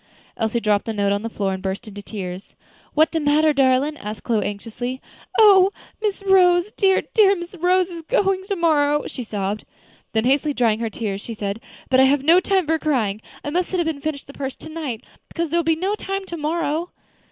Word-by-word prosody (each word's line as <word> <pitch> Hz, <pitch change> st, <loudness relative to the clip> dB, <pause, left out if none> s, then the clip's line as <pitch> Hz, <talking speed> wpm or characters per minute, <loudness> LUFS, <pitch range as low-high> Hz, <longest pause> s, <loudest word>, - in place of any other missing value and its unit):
Elsie 225 Hz, +1 st, 0 dB
dropped 210 Hz, -2 st, +1 dB
the 225 Hz, -, -3 dB
note 200 Hz, -1 st, +1 dB
on 200 Hz, 0 st, 0 dB
the 230 Hz, -, -4 dB
floor 200 Hz, -3 st, -2 dB
and 190 Hz, -, -5 dB
burst 190 Hz, +2 st, -4 dB
into 205 Hz, -1 st, -8 dB
tears. 190 Hz, -2 st, -7 dB, 0.4 s
"What 315 Hz, +1 st, +4 dB
de 325 Hz, -, 0 dB
matter, 300 Hz, +1 st, +3 dB
darlin'?" 275 Hz, +2 st, +2 dB
asked 210 Hz, -2 st, -7 dB
Chloe, 225 Hz, -3 st, +1 dB
anxiously. 230 Hz, +5 st, -5 dB, 0.4 s
"Oh! 395 Hz, -4 st, +7 dB, 0.3 s
Miss 410 Hz, -2 st, -2 dB
Rose, 365 Hz, 0 st, +4 dB
dear, 385 Hz, -3 st, +2 dB
dear 400 Hz, -3 st, +5 dB
Miss 345 Hz, 0 st, -8 dB
Rose 365 Hz, +1 st, +1 dB
is 335 Hz, -1 st, -7 dB
going 385 Hz, 0 st, +1 dB
tomorrow," 305 Hz, -6 st, +2 dB
she 255 Hz, -, -6 dB
sobbed. 205 Hz, -1 st, -3 dB, 0.5 s
Then 220 Hz, +1 st, +1 dB
hastily 280 Hz, +3 st, +2 dB
drying 225 Hz, -3 st, +2 dB
her 230 Hz, -1 st, -2 dB
eyes, 200 Hz, -3 st, -2 dB
she 230 Hz, -, -7 dB
said: 205 Hz, +1 st, -4 dB, 0.3 s
"But 260 Hz, -, +5 dB
I 265 Hz, -, +7 dB
have 275 Hz, 0 st, +2 dB
no 335 Hz, +5 st, +6 dB
time 380 Hz, -1 st, +1 dB
for 320 Hz, +1 st, +1 dB
crying. 220 Hz, -10 st, 0 dB, 0.2 s
I 290 Hz, -, -4 dB
must 355 Hz, +2 st, 0 dB
sit 370 Hz, -, -1 dB
up 345 Hz, -, +1 dB
and 315 Hz, -3 st, -3 dB
finish 305 Hz, -2 st, -3 dB
the 280 Hz, -, -13 dB
purse 270 Hz, -2 st, -5 dB
to 315 Hz, -, -11 dB
night, 290 Hz, -8 st, -5 dB, 0.2 s
because 335 Hz, -3 st, -3 dB
there 340 Hz, -, +2 dB
will 325 Hz, 0 st, +2 dB
not 390 Hz, +5 st, -1 dB
be -, -, -10 dB
time 390 Hz, 0 st, -3 dB
to 345 Hz, -, -6 dB
morrow." 320 Hz, +2 st, -1 dB
290 Hz, 215 wpm, -22 LUFS, 225-345 Hz, 0.5 s, Oh